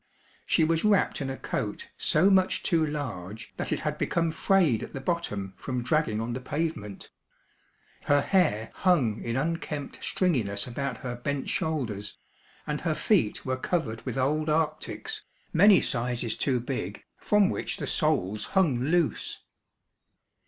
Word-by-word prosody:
She 165 - +3
was 165 +1 +2
wrapped 210 -6 +3
in 135 - -2
a 135 - -4
coat - - -4
so 180 +6 +3
much 190 -1 +3
too 165 -2 +2
large 115 - -5
that - - -3
it - - 0
had - - -2
become 165 -1 +1
frayed 165 - +3
at - - -7
the - - -4
bottom 120 - -2
from 125 -3 -3
dragging 125 -5 +1
on 115 +1 -2
the 125 - -3
pavement. 145 -7 -4 0.9
Her 145 0 +4
hair 150 - +2
hung 140 - +2
in 115 - -2
unkempt 150 0 -3
stringiness 110 - +1
about 125 0 -3
her 120 -1 -3
bent 140 +3 -3
shoulders, 115 -11 -2 0.5
and - - -3
her - - 0
feet - - +1
were 130 0 -1
covered 130 -6 -2
with 125 -1 -4
old 150 +4 +1
arctics, 160 - -1 0.3
many 195 +3 +7
sizes 120 -3 -1
too 130 -3 +1
big, 120 -5 -4 0.2
from 210 -2 +3
which - - -2
the - - -3
soles 105 - +1
hung 155 -10 +4
loose. 160 +5 0
140 Hz, 150 wpm, -28 LUFS, 120-165 Hz, 0.9 s, many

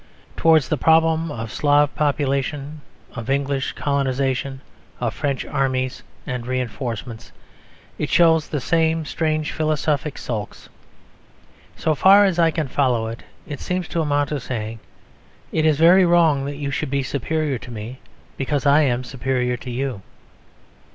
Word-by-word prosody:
Towards 160 -4 +4
the 155 - -1
problem 160 +1 +3
of 115 -4 -5
Slav 145 0 +3
population, 145 0 -1 0.3
of 115 -1 -7
English 140 -1 0
colonisation, 135 -1 -1 0.4
of 120 -2 -1
French 140 -3 -2
armies 130 -2 -1 0.2
and 125 -1 -4
reinforcements, 120 -2 -4 0.7
it - - -2
shows 160 -2 +4
the 150 - -2
same 160 +4 +1
strange 155 0 -1
philosophic 155 -2 -1
sulks. 110 -4 -6 1.1
So 160 - 0
far 195 +7 +6
as 185 -3 0
I 165 -1 +5
can 160 -2 -2
follow 125 -4 +1
it, 115 - -7 0.2
it 145 -6 -7
seems 180 -1 -3
to 170 - -1
amount 145 -2 0
to 150 - -2
saying 115 -3 -5 0.7
"It 160 0 +2
is 155 -2 +3
very 175 +4 +6
wrong 165 -5 +3
that 140 0 -5
you 140 -1 -3
should 135 - -2
be 140 0 0
superior 140 +1 -2
to - - -11
me, 115 +3 -7 0.4
because 140 +1 -1
I 145 +2 +5
am 125 -3 +1
superior 125 -1 -1
to 130 - -9
you." 125 -3 -3
140 Hz, 145 wpm, -21 LUFS, 130-155 Hz, 1.1 s, far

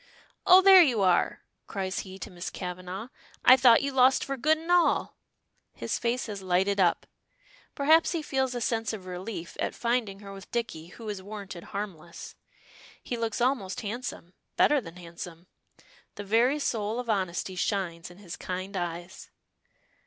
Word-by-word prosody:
"Oh, 370 +1 +8
there 385 -1 +9
you 250 -10 +3
are!" 180 -2 +2 0.2
cries 190 -2 -3
he 190 -1 -8
to - - -8
Miss 175 0 -6
Kavanagh. 185 +4 -6 0.4
"I 255 - +10
thought 245 -2 +6
you 280 - -1
lost 260 0 +4
for 275 - -3
good 310 +5 +2
and 325 +2 -5
all!" 350 -2 +3 0.6
His - - -3
face 240 +2 -1
has 205 -3 -6
lighted 190 +2 +1
up. 175 -3 +2 0.7
Perhaps 315 +5 +4
he 330 -2 -2
feels 265 -3 -1
a 245 - -3
sense 225 -1 -1
of 200 -4 -7
relief 180 -1 -6
at - - -2
finding 235 -5 -1
her 200 -1 -9
with 195 0 -11
Dicky, 225 -9 -3
who 225 +5 -11
is 205 -2 -4
warranted 200 -3 -8
harmless. 180 -5 -7 0.7
He 245 - -3
looks 230 0 -2
almost 240 -7 0
handsome, 215 -5 -6 0.2
better 295 -2 +4
than 165 -6 -11
handsome! 170 -1 -9 0.7
The 205 - -6
very 230 +7 +3
soul 225 -5 -2
of 250 - -5
honesty 190 -3 -1
shines, 175 -3 -2
in 175 - -15
his 190 -4 -8
kind 185 +2 -5
eyes. 175 0 -5
205 Hz, 165 wpm, -28 LUFS, 185-250 Hz, 0.7 s, I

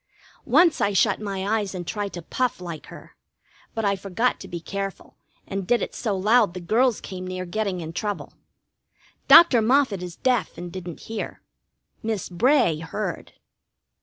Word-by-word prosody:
Once 315 +6 +4
I 200 - +2
shut 205 +1 +2
my 200 +1 -1
eyes 200 -2 -4
and 175 -1 -5
tried 205 +1 -3
to 175 - -7
puff 250 +5 -1
like 170 -3 -7
her, - - -13 0.6
but 225 -1 -1
I 200 0 +2
forgot 200 +6 -1
to - - -9
be 170 - -5
careful, 195 +3 -6 0.3
and 195 -2 -4
did 240 - +2
it - - -5
so 210 -5 -2
loud 210 -1 +3
the - - -4
girls 225 +7 +2
came 185 -1 -7
near 185 0 -4
getting 190 -1 -2
in 160 0 -6
trouble. 205 +3 -4 0.9
Dr. 285 -9 +8
Moffett 240 -4 +2
is 175 -1 -6
deaf, 245 -9 0
and 175 0 -7
didn't 175 -3 -7
hear. 225 -2 -6 0.6
Miss 220 -3 -3
Bray 215 - +3
heard. 175 +2 -5
200 Hz, 165 wpm, -24 LUFS, 180-225 Hz, 0.9 s, Dr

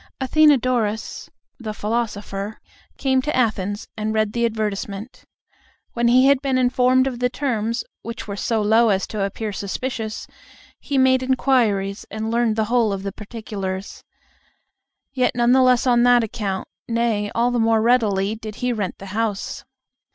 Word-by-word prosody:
Athenodorus, 255 -6 +2 0.3
the 215 -3 -5
philosopher, 210 -2 -3 0.4
came 265 -2 +2
to 300 +3 -2
Athens 205 -4 -1
and 215 0 -2
read 215 -1 +1
the 235 0 +2
advertisement. 215 0 -4 0.7
When 235 0 +1
he 255 +2 +5
had 275 -1 +4
been 270 -2 0
informed 255 +1 +3
of 255 -3 -3
the 250 0 +1
terms, 230 -4 -2 0.2
which 230 -1 -7
were 200 - -4
so 220 +2 0
low 225 +2 +4
as 195 -1 +1
to 215 - -5
appear 205 +2 -3
suspicious, 220 +2 -4 0.5
he 280 - -2
made 260 0 +4
inquiries, 235 -7 +1
and 220 +1 -4
learned 230 -2 +1
the 220 -1 +1
whole 230 -1 +2
of 195 -1 -4
the 200 - -3
particulars. 200 -3 -6 1.1
Yet 255 -1 +1
none 240 0 +3
the 260 +1 +5
less 255 -1 +4
on 240 -2 +4
that 245 -1 +5
account, 205 -4 -3 0.2
nay, 230 -3 0
all 240 +1 +2
the 245 - 0
more 225 0 +3
readily, 215 -4 +2
did 215 -1 -8
he 250 +1 -1
rent 205 -5 -3
the 195 - -10
house. 215 -2 -2
230 Hz, 160 wpm, -22 LUFS, 210-250 Hz, 1.1 s, he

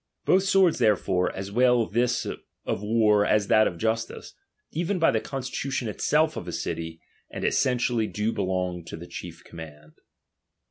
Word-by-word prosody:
Both 190 +1 +4
swords 190 -5 +4
therefore, 100 -5 +2
as 95 +1 -6
well 125 +1 +4
this 120 +2 0
of - - -6
war 105 -1 +3
as 105 0 +2
that 110 0 +5
of 85 - -4
justice, 115 +3 -2 0.4
even 175 +5 -1
by 165 - +4
the 110 - 0
constitution 135 0 -3
itself 155 +9 +1
of - - -6
a - - -4
city 80 0 -4 0.3
and - - -5
essentially 120 -3 +1
do 105 +2 -1
belong 90 -3 -2
to 80 - -7
the 85 - -9
chief - - -9
command. 75 -2 -12
110 Hz, 155 wpm, -26 LUFS, 95-125 Hz, 0.4 s, that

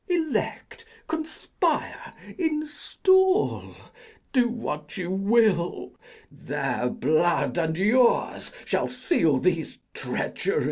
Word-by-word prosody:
Elect, 340 +6 -2 0.2
conspire, 315 0 -2 0.2
install, 370 +5 +1 0.6
do 245 -3 +3
what 150 -11 -5
you 180 -1 -3
will: 195 -2 +1 0.4
Their 135 -3 -2
blood 155 -2 +1
and 160 -1 -1
yours 235 +6 +2
shall - - 0
seal 165 - +1
these 165 +3 -1 0.2
treacheries. - - -2
205 Hz, 85 wpm, -25 LUFS, -, 0.6 s, do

